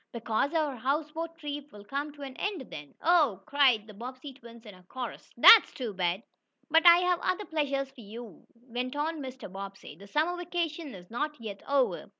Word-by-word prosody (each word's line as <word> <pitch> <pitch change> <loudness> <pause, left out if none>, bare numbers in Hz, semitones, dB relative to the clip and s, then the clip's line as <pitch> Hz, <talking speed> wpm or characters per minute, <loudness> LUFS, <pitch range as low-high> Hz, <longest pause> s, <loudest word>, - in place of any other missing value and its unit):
"Because 230 +4 0
our 300 -4 +1
houseboat 305 +6 -2
trip 290 -2 -6
will 205 -1 -12
come 280 +6 -3
to 290 -1 -10
an 265 -2 -7
end 375 - -4
then." 145 -1 -9
"Oh!" 300 - +3
cried 260 -7 +3
the 215 - -12
Bobbsey 255 +6 -8
twins 235 -3 -14
in 210 - -10
a 185 - -16
chorus. 245 +7 -7
"That's 450 - +9
too 240 -5 -4
bad!" 185 +2 -1 0.5
"But 325 +2 +6
I 340 0 +10
have 360 -1 +2
other 370 +3 -1
pleasures 275 -4 -1
for 270 -3 -14
you," 220 -2 -11
went 245 +2 -5
on 305 +1 -2
Mr. 260 -2 -7
Bobbsey. 195 -4 -9
"The 200 +5 -14
summer 315 - +1
vacation 335 - -3
is 180 +1 -13
not 300 +4 -3
yet 210 -3 -7
over." 275 -2 +1
270 Hz, 190 wpm, -29 LUFS, 225-305 Hz, 0.5 s, I